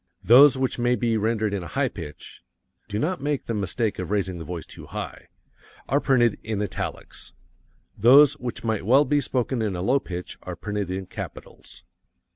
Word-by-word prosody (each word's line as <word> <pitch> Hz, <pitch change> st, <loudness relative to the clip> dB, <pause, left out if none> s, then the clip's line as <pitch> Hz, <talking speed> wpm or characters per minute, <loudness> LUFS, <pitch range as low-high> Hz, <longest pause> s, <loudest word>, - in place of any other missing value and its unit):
Those 130 Hz, +7 st, +7 dB
which 130 Hz, -1 st, -1 dB
may 120 Hz, +1 st, +2 dB
be 115 Hz, -2 st, 0 dB
rendered 110 Hz, -1 st, 0 dB
in 100 Hz, -, -2 dB
a 85 Hz, -, -7 dB
high 135 Hz, +5 st, 0 dB
pitch 80 Hz, -10 st, -9 dB, 0.5 s
do 105 Hz, 0 st, -4 dB
not 165 Hz, +7 st, -1 dB
make 145 Hz, -1 st, -2 dB
the 115 Hz, -, -3 dB
mistake 105 Hz, +2 st, -2 dB
of 90 Hz, -2 st, -4 dB
raising 95 Hz, -4 st, -1 dB
the -, -, -6 dB
voice 85 Hz, +1 st, -6 dB
too -, -, -12 dB
high -, -, -7 dB, 0.6 s
are 140 Hz, -, +2 dB
printed 120 Hz, -5 st, +2 dB
in 110 Hz, -2 st, -3 dB
italics. 105 Hz, -3 st, -5 dB, 0.6 s
Those 130 Hz, +6 st, +7 dB
which 120 Hz, -2 st, -5 dB
might 110 Hz, -3 st, -1 dB
well 130 Hz, +8 st, +5 dB
be 145 Hz, +2 st, +2 dB
spoken 125 Hz, -2 st, -1 dB
in 105 Hz, -4 st, -1 dB
a 90 Hz, -, -3 dB
low 130 Hz, +7 st, +3 dB
pitch 90 Hz, -7 st, -7 dB
are -, -, -6 dB
printed 105 Hz, -2 st, -4 dB
in 95 Hz, +1 st, -4 dB
CAPITALS. -, -, -10 dB
110 Hz, 185 wpm, -24 LUFS, 100-130 Hz, 0.6 s, Those